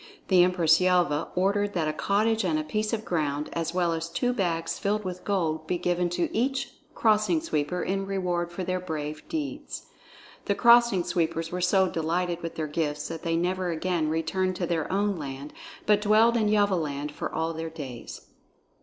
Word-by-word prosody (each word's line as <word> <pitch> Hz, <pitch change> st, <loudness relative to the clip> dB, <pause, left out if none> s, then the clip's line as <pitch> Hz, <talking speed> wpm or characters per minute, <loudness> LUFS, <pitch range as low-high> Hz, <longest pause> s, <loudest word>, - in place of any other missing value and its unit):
The 185 Hz, -2 st, +6 dB
Empress 175 Hz, -2 st, +4 dB
Yelva 175 Hz, -5 st, +2 dB
ordered 200 Hz, +2 st, +1 dB
that 160 Hz, -3 st, +1 dB
a 155 Hz, -, 0 dB
cottage 215 Hz, +6 st, +1 dB
and 165 Hz, -4 st, +1 dB
a 155 Hz, -, -1 dB
piece 215 Hz, +7 st, -2 dB
of 225 Hz, -1 st, -2 dB
ground, 150 Hz, -3 st, -1 dB
as 165 Hz, -1 st, -2 dB
well 175 Hz, -1 st, +1 dB
as 165 Hz, 0 st, -3 dB
two 245 Hz, +9 st, 0 dB
bags 165 Hz, -6 st, -1 dB
filled 210 Hz, 0 st, -1 dB
with 180 Hz, -1 st, -5 dB
gold, 160 Hz, -6 st, -1 dB
be 180 Hz, -, 0 dB
given 175 Hz, 0 st, 0 dB
to 175 Hz, 0 st, 0 dB
each 270 Hz, +4 st, 0 dB, 0.2 s
Crossing 215 Hz, +7 st, +3 dB
Sweeper 180 Hz, -, -1 dB
in 195 Hz, +1 st, -2 dB
reward 180 Hz, -3 st, -1 dB
for 185 Hz, +2 st, -4 dB
their 185 Hz, +1 st, -1 dB
brave 155 Hz, -4 st, -4 dB
deeds. 300 Hz, -2 st, -4 dB, 0.6 s
The 200 Hz, -, +1 dB
Crossing 235 Hz, -4 st, +5 dB
Sweepers 165 Hz, -2 st, -1 dB
were 180 Hz, +1 st, -3 dB
so 190 Hz, +1 st, +4 dB
delighted 175 Hz, +1 st, -1 dB
with 165 Hz, -, -5 dB
their 160 Hz, -, -2 dB
gifts 150 Hz, -1 st, -2 dB
that 165 Hz, -1 st, -5 dB
they 165 Hz, -1 st, -1 dB
never 180 Hz, +2 st, 0 dB
again 165 Hz, -1 st, 0 dB
returned 185 Hz, +4 st, 0 dB
to 180 Hz, -, -2 dB
their 165 Hz, -2 st, -1 dB
own 200 Hz, 0 st, +1 dB
land 140 Hz, -1 st, -7 dB, 0.3 s
but 210 Hz, -1 st, +4 dB
dwelled 220 Hz, +3 st, +4 dB
in 220 Hz, -2 st, +2 dB
Yelvaland 165 Hz, -9 st, +1 dB
for -, -, -5 dB
all 160 Hz, +1 st, -1 dB
their 165 Hz, 0 st, -4 dB
days. 140 Hz, -7 st, -8 dB
180 Hz, 185 wpm, -27 LUFS, 160-200 Hz, 0.6 s, The